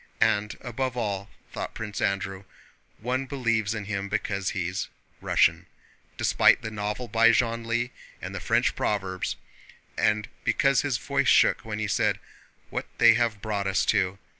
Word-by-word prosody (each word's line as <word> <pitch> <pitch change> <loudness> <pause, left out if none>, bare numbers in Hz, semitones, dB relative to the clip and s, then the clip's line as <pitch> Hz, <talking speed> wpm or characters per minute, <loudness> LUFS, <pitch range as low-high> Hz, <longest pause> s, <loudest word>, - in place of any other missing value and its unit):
And 105 -1 +2
above 125 +1 -3
all," 100 -3 -2 0.2
thought - - -5
Prince 105 -2 -5
Andrew, 95 0 -2 0.5
"one 130 +4 -2
believes 115 -5 0
in 105 -1 -5
him 100 -1 -3
because 100 -1 -1
he's 90 +1 -3 0.3
Russian, - - +2 0.5
despite - - +4
the 110 - -4
novel 105 +3 -3
by 115 0 +5
Genlis 115 +1 +1 0.3
and - - -7
the - - -4
French - - +1
proverbs, 95 -3 -2 0.6
and 105 0 +1 0.2
because 135 -1 +3
his 140 -5 0
voice 140 +3 -1
shook - - +5
when 110 -2 -5
he 110 0 -2
said: - - +1 0.5
'What - - -3
they 115 -1 +7
have 115 -3 0
brought 105 -3 -1
us 95 0 +1
to! 95 +1 +1
110 Hz, 150 wpm, -26 LUFS, 100-120 Hz, 0.6 s, they